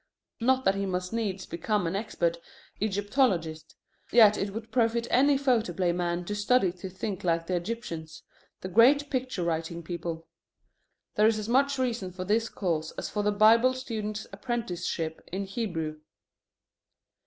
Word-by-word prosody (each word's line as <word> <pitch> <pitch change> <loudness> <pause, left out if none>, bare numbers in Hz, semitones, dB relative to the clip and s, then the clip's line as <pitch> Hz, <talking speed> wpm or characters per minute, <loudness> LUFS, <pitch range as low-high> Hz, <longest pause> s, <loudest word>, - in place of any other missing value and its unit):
Not 260 +2 +2
that 195 - +4
he 195 0 -2
must 180 +1 -3
needs 200 -5 -2
become 205 +3 -1
an 165 +3 -1
expert 170 -5 -1 0.4
Egyptologist. 200 - 0 0.4
Yet 215 -3 +7
it 200 0 -2
would 225 +2 -7
profit 230 -1 +2
any 280 +2 +5
photoplay 220 - +1
man 175 0 -2
to 205 - -3
study 205 -1 +2
to 185 +1 -8
think 190 +1 -5
like 165 -1 +1
the 185 - -3
Egyptians, 175 -5 -5 0.4
the - - -4
great 265 +9 +5
picture 255 -8 -2
writing 165 0 -2
people. 165 -1 -5 0.9
There 210 +1 +4
is 220 -1 +2
as 215 -1 -4
much 275 +3 +2
reason 235 -7 -1
for 185 0 -6
this 220 +3 +1
course 160 -5 -2
as - - -4
for 210 - -1
the 210 0 +2
Bible 225 +5 +5
student's 215 -4 -4
apprenticeship 185 -8 -3
in 195 +2 -3
Hebrew. 175 -7 -3
205 Hz, 155 wpm, -28 LUFS, 175-230 Hz, 0.9 s, Yet